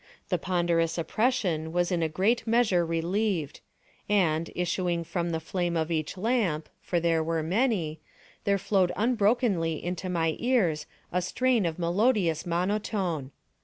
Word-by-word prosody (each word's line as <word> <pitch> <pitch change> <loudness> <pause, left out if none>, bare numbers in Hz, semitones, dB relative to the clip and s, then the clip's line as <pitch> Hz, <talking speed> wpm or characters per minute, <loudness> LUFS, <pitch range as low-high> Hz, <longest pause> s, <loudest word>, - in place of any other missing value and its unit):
The - - +1
ponderous 170 -2 +1
oppression 170 -4 0
was 175 +1 +1
in 175 -2 +1
a 160 - +1
great 200 +10 +1
measure 220 -6 +3
relieved; 165 0 -1 0.5
and, 170 -5 +2
issuing 175 -1 -1
from 170 +1 -2
the 165 -1 -1
flame 175 +1 -2
of 160 +1 -1
each 160 +3 -2
lamp, 190 -8 0
(for 175 - 0
there 165 -1 +2
were 165 0 -1
many,) 180 -4 0 0.4
there 200 0 +2
flowed 190 -2 +2
unbrokenly 215 -6 +2
into 180 +1 -3
my 165 -3 0
ears 205 -12 +1 0.2
a 180 - +1
strain 235 +2 +1
of 160 - -4
melodious 180 -2 +1
monotone. 180 -4 -1
175 Hz, 140 wpm, -28 LUFS, 165-205 Hz, 0.5 s, measure